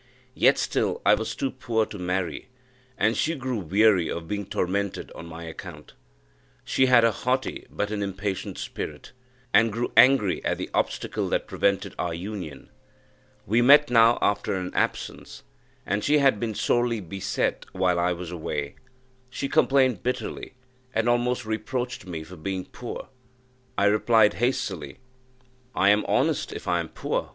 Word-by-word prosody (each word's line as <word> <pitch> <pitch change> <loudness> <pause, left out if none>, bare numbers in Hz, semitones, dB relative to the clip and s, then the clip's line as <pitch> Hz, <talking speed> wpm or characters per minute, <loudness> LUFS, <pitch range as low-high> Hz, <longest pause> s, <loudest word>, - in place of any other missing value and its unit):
Yet - - +4
still 460 - 0
I - - +7
was - - -1
too 275 -2 -2
poor 110 -2 -1
to 105 - -9
marry, 90 +4 -3 0.5
and 110 -1 +2
she 165 +2 0
grew 130 -5 -3
weary 95 0 +3
of 85 -1 -5
being 100 0 -3
tormented 100 +1 -2
on 85 - -10
my 85 0 -9
account. 80 -1 -9 0.7
She 130 - +2
had 125 -2 +6
a 115 - +5
haughty 130 +4 -2
but 105 0 -3
an 105 -1 -2
impatient 100 0 -3
spirit, - - -6 0.4
and 110 +3 +5
grew 115 +3 -2
angry 125 -7 +5
at - - 0
the - - -6
obstacle - - -1
that - - 0
prevented 100 0 0
our 85 -2 -1
union. 90 -6 -7 0.7
We 115 +5 +2
met 145 +3 +6
now 115 0 +6
after 100 -1 +1
an 90 -1 -4
absence, - - -3 0.4
and 100 +1 -1
she 150 +1 +4
had 135 -7 +3
been 110 -2 -3
sorely 120 0 +1
beset 95 +1 -2
while 90 -2 +1
I 90 +1 +2
was 90 -1 -5
away; 75 -4 -4 0.5
she 140 - -3
complained 130 -6 +3
bitterly, 125 +1 -4 0.4
and 115 +1 +1
almost 120 0 +1
reproached 110 0 -3
me 80 -3 -5
for 90 +3 -12
being 95 +3 -4
poor. 120 - -8 0.7
I 100 - +3
replied 110 +1 +4
hastily, 125 +2 -1 0.8
"I 100 - +4
am 105 +1 +3
honest, - - +1
if - - -8
I 85 - +2
am 85 -2 -4
poor! - - -3
105 Hz, 160 wpm, -25 LUFS, 90-120 Hz, 0.8 s, I